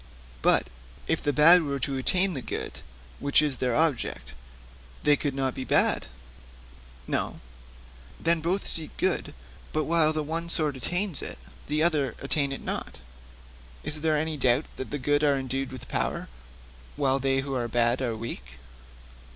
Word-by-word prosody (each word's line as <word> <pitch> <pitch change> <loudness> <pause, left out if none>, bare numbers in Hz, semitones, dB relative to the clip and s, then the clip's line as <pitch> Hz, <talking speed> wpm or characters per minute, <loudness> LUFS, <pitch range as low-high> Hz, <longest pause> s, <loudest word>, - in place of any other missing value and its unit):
'But - - +4 0.4
if - - 0
the 145 - +1
bad 165 +5 +8
were 140 -3 -2
to 135 +1 -2
attain 185 +8 +2
the 135 - -4
good - - -5 0.4
which 140 0 +4
is 150 -4 +2
their 125 -2 0
object, 115 - 0 0.7
they 150 - +5
could 145 -2 -2
not 135 -1 0
be 130 - -5
bad?' - - +2 1.0
'No.' - - -2 0.8
'Then, 170 0 +2
since 160 - -8
both 185 +4 -1
seek 160 -2 -1
good, - - -1 0.4
but 155 - 0
while 160 -1 +3
the 155 -1 -1
one 165 +3 -3
sort 155 -4 +1
attain 180 +9 -1
it, - - -6 0.3
the 150 +2 +1
other 150 -7 +1
attain 140 0 0
it 135 - -5
not, - - -4 0.9
is 150 0 -2
there 155 -1 +2
any 155 0 -2
doubt 130 +2 +3
that 130 - -5
the 145 - -3
good 145 +2 +1
are 145 -2 +4
endued 135 0 -3
with 130 - -9
power, - - -2 0.7
while 135 -1 +1
they 135 0 +1
who 135 0 -5
are 120 -2 -1
bad 120 +2 +1
are 120 -3 -1
weak?' 65 - -7
140 Hz, 165 wpm, -27 LUFS, 130-155 Hz, 1.0 s, bad